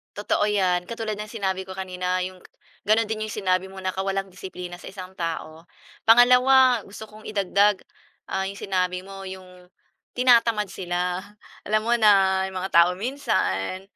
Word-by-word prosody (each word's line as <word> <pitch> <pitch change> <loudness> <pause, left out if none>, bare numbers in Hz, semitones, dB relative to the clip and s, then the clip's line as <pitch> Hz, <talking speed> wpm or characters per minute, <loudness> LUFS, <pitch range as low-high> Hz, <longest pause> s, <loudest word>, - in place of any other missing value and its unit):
Totoo 205 0 0
'yan, 185 -4 +1
katulad 220 -1 -4
ng 210 - -5
sinabi 190 -4 -3
ko 190 - -8
kanina 185 -1 -2
'yong 185 0 -6
k - - -17 0.4
gano'n 215 +2 +4
din 215 0 -2
'yong 215 - -6
sinabi 185 -2 0
mo 190 0 -10
na 185 - -1
kawalang 195 0 -3
disiplina 180 -1 -8
sa - - -13
isang 185 -1 -8
tao. 165 -1 -5 0.4
Pangalawa, 250 +1 +6
gusto 205 +2 -10
kong 215 0 -14
idagdag, 200 0 +2 0.5
ah, 190 0 -1
'yong 195 - -5
sinabi 180 -1 -1
mo, 195 0 -10
'yong 185 -1 -11 0.5
tinatamad 230 -5 +3
sila, 180 -1 -2 0.5
alam 215 +1 +1
mo 235 +2 +1
na, 195 -3 +4
'yong 190 - -8
mga 190 +1 -4
tao 170 +1 +6
minsan, 185 - -2
190 Hz, 165 wpm, -24 LUFS, 185-215 Hz, 0.5 s, Pangalawa